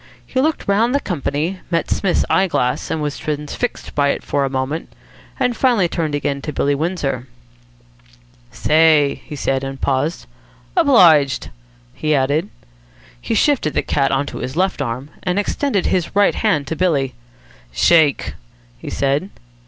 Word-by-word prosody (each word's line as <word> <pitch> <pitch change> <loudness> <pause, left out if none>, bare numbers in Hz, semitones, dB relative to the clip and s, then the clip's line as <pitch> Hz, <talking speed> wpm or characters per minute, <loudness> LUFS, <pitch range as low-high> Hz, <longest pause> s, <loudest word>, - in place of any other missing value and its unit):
He 260 - -1
looked 310 +2 -1
round 225 +6 +2
the - - +3
company, 165 - -2
met 170 -1 -1
Psmith's 190 -3 +1
eye 190 0 +3
glass, 125 -7 -1
was 150 -2 -2
transfixed 150 +10 -4
by 145 -1 +2
it - - -2
for 145 - 0
a - - -2
moment, 135 +4 -3 0.5
and 250 -2 +1
finally 235 -7 +3
turned 160 -3 -2
again 140 -1 -2
to 150 - -4
Billy 145 0 +1
Windsor. 140 -5 -2 1.2
"Say!" 155 -2 +3
he 150 - -7
said, 135 -1 -1
and 135 0 -5
paused. 140 - -1 0.5
"Obliged," 150 -6 +4 0.4
he 155 - 0
added. 145 +8 +1 0.7
He - - -2
shifted 270 - +2
the - - +1
cat 135 -2 +1
on 135 +1 +1
to - - -7
his 130 - -5
left 185 -2 0
arm, 130 +3 -4
and 180 +1 -1
extended 205 0 0
his 180 0 -1
right 205 0 +4
hand 195 -10 +1
to 160 - -4
Billy. 145 -8 +1 0.6
"Shake!" 145 - +3 0.5
he - - -7
said. 140 +7 0
155 Hz, 150 wpm, -19 LUFS, 140-185 Hz, 1.2 s, Obliged